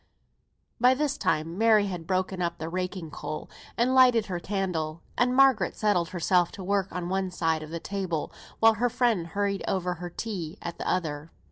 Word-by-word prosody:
By 250 +2 +5
this 290 0 0
time 165 - -1
Mary 220 -2 +5
had 175 -4 -5
broken 185 0 -1
up 170 0 -1
the 160 -1 -5
raking 180 -2 -4
coal, 155 - -6 0.3
and 245 +2 +2
lighted 250 -4 +6
her 180 -3 -3
candle; 170 -5 -3
and 250 +1 +2
Margaret 260 -8 +4
settled 190 -6 +1
herself 175 0 +2
to - - -8
her - - -8
work 200 -1 +1
on 180 -1 -4
one 190 +1 -1
side 165 -3 0
of 155 - -8
the 170 +1 -4
table, 185 -4 -3 0.3
while 225 0 +6
her 240 +3 +1
friend 230 -8 +1
hurried 200 +2 -1
over 180 -2 0
her 175 +1 -7
tea 180 -3 -5
at 170 - -7
the - - -2
other. 155 -4 -2
185 Hz, 195 wpm, -27 LUFS, 170-210 Hz, 0.3 s, lighted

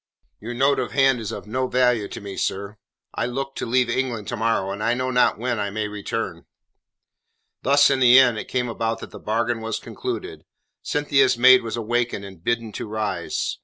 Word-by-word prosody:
"Your 120 +3 -6
note 135 +3 +2
of 125 - -3
hand 135 -2 +3
is 110 -3 -5
of - - -7
no 130 +4 -2
value 125 -5 +2
to - - -8
me, 100 -1 -8
sir. 100 +2 -3 0.4
I 115 - -1
look 135 +2 -4
to - - -3
leave 125 +1 +2
England 120 -4 -2
to 120 - -2
morrow, 110 -4 0
and 100 +2 -5
I 115 +2 +1
know 130 +1 -2
not 125 0 +3
when 120 0 -2
I 100 -1 -1
may 105 +1 -3
return." 105 -1 -5 1.1
Thus 140 +2 +5
in 135 - +1
the 125 0 +7
end 125 -4 +5
it - - -7
came 125 -1 -1
about 115 0 -2
that - - -9
the - - -10
bargain 115 +1 -1
was 110 0 -3
concluded. - - -6 0.4
Cynthia's 135 -4 +2
maid 130 +1 +7
was 115 0 -4
awakened 115 -2 -1
and 95 -4 -12
bidden 115 0 -1
to 105 - -6
rise. 110 0 -3
120 Hz, 200 wpm, -23 LUFS, 110-130 Hz, 1.1 s, the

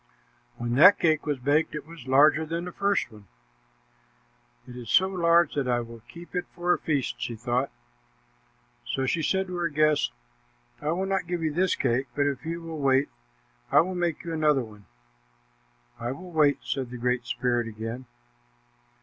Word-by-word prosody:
When 120 0 -3
that 185 +7 +8
cake 155 -3 +1
was 145 -2 0
baked, 145 +5 +1
it 150 - -5
was 160 -5 -12
larger 150 +4 +5
than 165 +2 -4
the 180 - -6
first 200 -9 0
one. 105 -2 -15 1.4
"It 125 - -10
is 120 -3 -8
so 190 - +5
large 170 -3 +3
that 140 -3 -1
I 120 -1 +1
will 115 -1 -10
keep 170 +1 -12
it 180 -1 -2
for 175 0 +2
a - - -2
feast," 140 -5 -2
she 120 - -3
thought. 120 +4 -1 1.1
So 135 - -2
she 165 +5 0
said 190 +4 +1
to 180 -1 -6
her 175 -1 0
guest, 150 - +2 0.7
"I - - -5
will 180 +4 0
not 195 -2 -1
give 175 -1 -2
you 155 -2 0
this 185 +3 +2
cake, 130 +1 0
but 145 - +2
if 145 +2 -2
you 170 +1 -3
will 165 -2 -6
wait, 135 0 +2 0.6
I - - +7
will 185 +2 -3
make 175 -2 -2
you 170 - -5
another 150 -4 +2
one." 105 -3 -14 1.1
"I 120 +2 -3
will 180 +5 -10
wait," 150 -4 +3
said 130 -1 -3
the 125 - -7
Great 125 0 -1
Spirit 120 -2 0
again. 115 +3 -6
150 Hz, 185 wpm, -26 LUFS, 125-170 Hz, 1.4 s, that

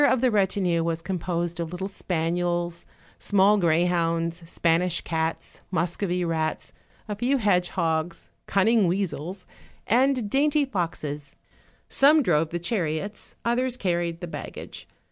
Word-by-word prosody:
193 260 -3 +5
of - - -4
the 245 -4 +3
retinue 190 -4 +2
was 165 0 -2
composed 175 -2 -2
of 165 -1 -3
little 185 +2 -4
spaniels, 175 -1 -2 0.3
small 205 +1 +4
greyhounds, 170 0 +1
Spanish 170 +1 +1
cats, 160 0 -3
Muscovy 180 +1 -1
rats, 160 -1 -2 0.3
a 210 - -3
few 250 +6 +1
hedge 185 -6 +2
hogs, 165 -1 -1 0.2
cunning 210 +1 +3
weasels, 180 0 -2 0.4
and 250 0 +2
dainty 290 +5 +2
foxes; 155 - -4 0.5
some 295 +2 +5
drove 160 -5 +2
the 175 - -2
chariots, 175 +1 -3
others 250 +1 +1
carried 170 -3 -1
the 175 - -4
baggage. - - -8
175 Hz, 125 wpm, -25 LUFS, 165-205 Hz, 0.5 s, 193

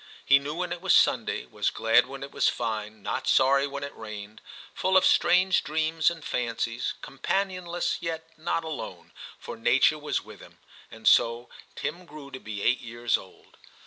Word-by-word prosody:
He 140 0 +6
knew 145 +2 -5
when 180 0 -2
it 175 - -8
was 190 -1 +4
Sunday, - - +2
was - - -1
glad 115 +2 +3
when 135 +1 -8
it 140 - -8
was 140 - +2
fine, 110 -2 -4
not 100 - -3
sorry 135 +1 +4
when 140 0 -6
it 140 - -7
rained, 105 -1 -9 0.3
full 190 0 +2
of 190 - +4
strange 185 0 +4
dreams 160 +1 +1
and 165 -2 -8
fancies, 115 -1 -2
companionless 180 +3 -2
yet 165 -1 -4
not 165 +1 -2
alone, 160 -2 -7 0.3
for - - -8
nature - - +3
was - - -2
with - - -12
him. - - -15 0.3
And - - -6
so 115 +1 +4 0.3
Tim 180 0 -5
grew 145 -2 -11
to 130 - -7
be 105 -3 -6
eight 125 - +2
years 120 0 -1
old. 95 - -10
140 Hz, 175 wpm, -27 LUFS, 115-165 Hz, 0.3 s, He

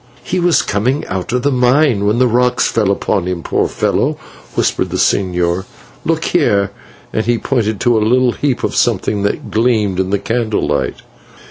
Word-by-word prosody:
"He 185 - -2
was 175 -1 +3
coming 125 +8 -1
out 95 -1 -4
of 125 0 0
the 145 - +2
mine 125 -4 +2
when 105 +3 +2
the 130 - +4
rock 125 +1 +1
fell 110 -4 +1
upon 100 -2 0
him, 90 -2 -3
poor - - 0
fellow," - - 0 0.4
whispered - - 0
the - - -3
señor. 90 -1 +1 0.4
"Look - - 0
here," 100 -1 +1 0.4
and 110 +1 -1
he 120 0 +2
pointed 110 -5 -1
to 120 -2 +3
a - - -1
little 125 +3 +3
heap 135 0 -2
of - - -1
something 105 -1 +1
that 100 - -2
gleamed 110 -5 +1
in 95 0 0
the 100 - +1
candle 115 0 -1
light. - - -2
110 Hz, 185 wpm, -16 LUFS, 100-125 Hz, 0.4 s, the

